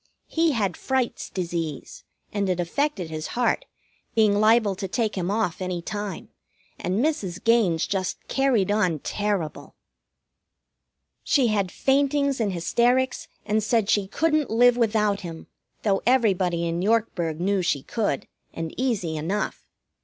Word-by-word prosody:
He 325 -2 +1
had 200 -7 -1
Fright's 260 -2 -1
disease, 170 -5 -4 0.3
and 200 -2 0
it 180 -1 0
affected 185 - -1
his 155 0 -4
heart, 245 - +1 0.5
being 210 -2 +4
liable 215 -1 +4
to 195 - -3
take 220 +2 -1
him 180 -1 -2
off 200 -4 -1
any 180 -1 -2
time, 200 +1 -5 0.5
and 190 +9 0
Mrs. 195 - -2
Gaines 220 -8 +3
just 190 -2 -2
carried 250 -8 +2
on 185 -6 +2
terrible. 200 -1 -3 1.5
She 260 -5 +2
had 200 -4 0
faintings 280 0 +1
and 205 -3 +1
hysterics, 240 +9 +1 0.2
and 215 +1 +1
said 220 -2 +2
she 200 -2 +2
couldn't 305 +5 +1
live 245 +2 +5
without 210 -3 +1
him, 165 -3 -8 0.4
though 195 -3 +2
everybody 190 -9 +2
in 170 +1 -1
Yorkburg 190 -7 0
knew 195 +2 +1
she 145 -6 0
could, 215 -2 -2 0.3
and 165 -1 -4
easy 200 -11 -1
enough. 185 +8 -3
205 Hz, 140 wpm, -25 LUFS, 180-235 Hz, 1.5 s, live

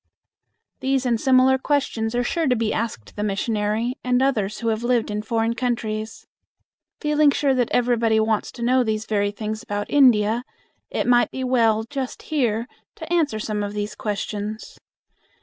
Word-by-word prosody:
These 265 -1 0
and 235 -3 +1
similar 265 0 +4
questions 250 -6 -1
are 245 - +1
sure 325 +5 0
to 250 - +3
be 225 -2 0
asked 125 - -4
the - - -4
missionary 210 +3 -1
and 250 0 +2
others 215 -6 0
who 230 - 0
have 220 0 -1
lived 240 -3 +1
in 210 0 -2
foreign 225 +1 0
countries. 225 -3 -3 0.7
Feeling 300 -1 +3
sure 280 -1 +2
that 250 -3 +1
everybody 235 -2 +2
wants 220 -1 0
to 240 - -6
know 255 +1 +3
these 220 -1 -2
very 205 -2 0
things 215 +1 -5
about 205 0 -4
India, 235 -4 +4 0.5
it - - -1
might 240 0 +4
be 260 - -5
well 230 -4 +2
just 260 +2 -5
here 235 -7 0 0.3
to 320 +1 -5
answer 305 -9 +1
some 215 -1 -3
of 205 0 -3
these 210 0 -3
questions. 210 +1 -5
230 Hz, 165 wpm, -23 LUFS, 215-255 Hz, 0.7 s, similar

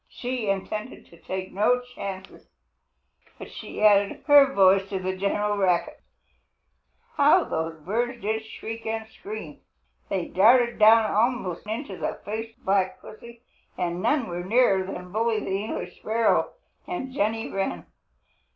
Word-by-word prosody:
She 245 -4 -4
intended 210 +5 -4
to 170 - -18
take 185 0 -5
no 215 +6 +3
chances, 200 -6 -9 0.9
but - - -10
she - - -7
added 205 -1 +4
her 285 -2 +7
voice 195 -3 +4
to 195 - -2
the 185 0 -3
general 205 +2 -1
racket. 180 -3 0 1.2
How 300 +5 +5
those 160 0 -4
birds 240 +8 -2
did 220 +1 -2
shriek 225 +1 -8
and 220 0 -3
scream! 205 -9 -9 0.5
They 190 -3 -1
darted 235 +5 +4
down 220 +1 +6
almost 215 -5 0
into 220 -3 -5
the - - -4
face 225 +2 -5
of - - -31
Black 190 -1 +1
Pussy, 235 +2 -13 0.3
and 175 -1 -2
none 290 0 +1
went 175 0 -5
nearer 210 -4 +3
than 180 -1 -7
Bully 225 +1 +1
the 195 -1 -2
English 220 - -5
Sparrow 225 +1 +1 0.4
and 265 -8 -5
Jenny 225 -2 -1
Wren. 195 - -3
210 Hz, 140 wpm, -25 LUFS, 190-235 Hz, 1.2 s, her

